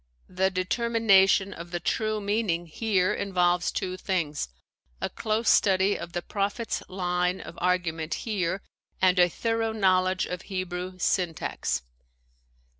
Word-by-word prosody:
The 190 +1 +1
determination 195 0 +3
of 170 +1 -9
the 175 0 -3
true 215 +3 0
meaning 200 -4 0
here 190 +2 +1
involves 180 -3 +1
two 185 0 -3
things: 165 - -2 0.5
a - - -3
close 220 +1 -1
study 195 0 +4
of 170 - -7
the 175 - -2
prophet's 205 +3 -2
line 180 0 0
of - - -9
argument 170 -3 0
here 190 -4 -1 0.4
and 185 -1 +4
a 175 0 +6
thorough 225 +3 -1
knowl 185 -3 +3
edge 185 0 0
of 180 0 -5
Hebrew 185 -1 -4
syntax. 170 - -1
185 Hz, 130 wpm, -27 LUFS, 180-205 Hz, 0.5 s, a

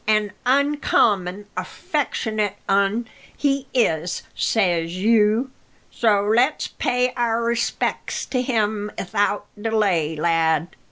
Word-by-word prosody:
"An 215 -1 +2 0.2
uncommon 220 -9 +2
affectionate 215 -3 -2
un 200 +4 +1 0.3
he 275 -2 0
is, 175 -8 0
says 175 -5 0
you, 220 +4 +3 0.4
so 210 -3 +2
let's 240 +8 +2
pay 250 0 0
our 235 -1 0
respec's 235 0 -1
to 255 - +1
him 215 -4 -1
'ithout 205 +2 0 0.2
delay, 200 -8 +1
lad." 165 +1 +1
215 Hz, 100 wpm, -22 LUFS, 190-235 Hz, 0.4 s, you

